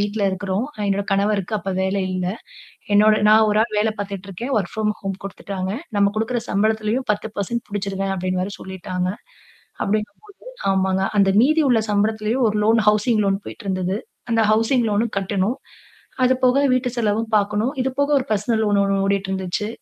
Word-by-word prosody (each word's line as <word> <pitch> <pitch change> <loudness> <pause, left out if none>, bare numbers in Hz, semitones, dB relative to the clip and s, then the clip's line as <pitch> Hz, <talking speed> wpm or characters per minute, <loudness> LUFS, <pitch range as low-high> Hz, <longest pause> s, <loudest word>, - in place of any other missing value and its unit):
வீட்ல 205 +1 -1
இருக்குறோம். 190 +4 -2 0.2
என்னோட 200 0 0
கணவருக்கு 200 0 0
அப்ப 195 +2 -4
வேலை 190 +1 0
இல்ல. 185 -1 -2 0.7
என்னோட 215 +1 +6
நான் 220 0 +6
ஒரு 210 - +2
ஆள் 220 -2 -4
வேல 220 +1 +2
பார்த்துட்டுருக்கேன். 200 +5 -5
வொர்க் 190 -4 -4
ப்ராம் 215 -1 0
ஹோம் 195 -1 -4
குடுத்துட்டாங்க. 195 -1 -5 0.3
நம்ம 200 0 +3
குடுக்கிற 230 +2 0
சம்பளத்திலேயும் 220 +4 0
10% 215 +2 -4
புடிச்சுருவேன் 195 -1 -2
அப்டின்னு 185 0 -1
வேற 200 +2 -4
சொல்லிட்டாங்க. 185 -1 -4 0.8
அப்டிங்கும் 210 0 -2
போது 410 -1 -17 0.3
ஆமாங்க 190 0 +1
அந்த 195 -1 +4
மீதி 310 +6 +4
உள்ள 240 -3 +4
சம்பளத்திலேயும் 215 +4 +1
ஒரு 210 - -1
லோன், 225 +1 +4
ஹவுசிங் 215 +1 +3
லோன் 195 0 +1
போயிட்டுருந்தது. 190 -2 -3 0.3
அந்த 230 -1 +3
ஹவுசிங் 230 +3 +2
லோன்னும் 215 +2 0
கட்டணும். 195 +4 -1 0.7
அது 255 +1 +4
போக 255 +2 +4
வீட்டு 255 0 +1
செலவும் 220 0 0
பார்க்கணும். 210 +4 +1
இது 265 - 0
போக 285 +1 +2
ஒரு 255 - -3
பெர்சனல் 220 +2 +1
லோன் 205 -1 +2
ஒண்ணு 195 0 +1
ஓடிட்டு 195 0 0
இருந்துச்சு. 190 +2 -2
205 Hz, 165 wpm, -21 LUFS, 195-220 Hz, 0.8 s, என்னோட